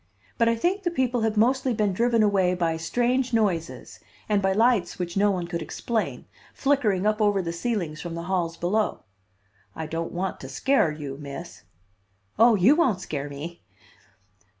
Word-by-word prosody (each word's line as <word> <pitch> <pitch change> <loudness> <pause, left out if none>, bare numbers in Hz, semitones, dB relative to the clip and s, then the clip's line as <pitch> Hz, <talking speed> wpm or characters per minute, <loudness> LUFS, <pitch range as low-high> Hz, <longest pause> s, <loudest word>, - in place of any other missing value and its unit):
But 230 0 +4
I 230 - +2
think 360 - 0
the 360 - 0
people 255 -7 0
have 220 -1 0
mostly 255 +2 +2
been 210 -2 +1
driven 230 +2 +2
away 190 -3 +2
by 165 -2 0
strange 245 +9 0
noises 190 -7 -1 0.3
and 210 -2 +2
by 190 0 +2
lights 220 -3 +2
which 175 -1 -4
no 205 +1 +3
one 185 -3 -1
could 170 -1 -4
explain, 220 +7 -3 0.3
flickering 225 -9 +1
up 215 +1 +1
over 205 -2 +3
the 170 -2 -3
ceilings 170 -5 -3
from 170 -1 -5
the 170 - -5
halls 175 -2 -1
below. 210 +5 -1 0.7
I 160 - -4
don't 165 +2 -4
want 185 +1 -3
to 135 - -9
scare 165 - +2
you, 145 -3 -6
Miss 140 -2 -8 0.4
" 100 - -32
"Oh, 230 0 +7
you 210 +9 +5
won't 260 - +2
scare 145 -5 -5
me." 155 +5 -8
195 Hz, 175 wpm, -25 LUFS, 170-230 Hz, 0.7 s, Oh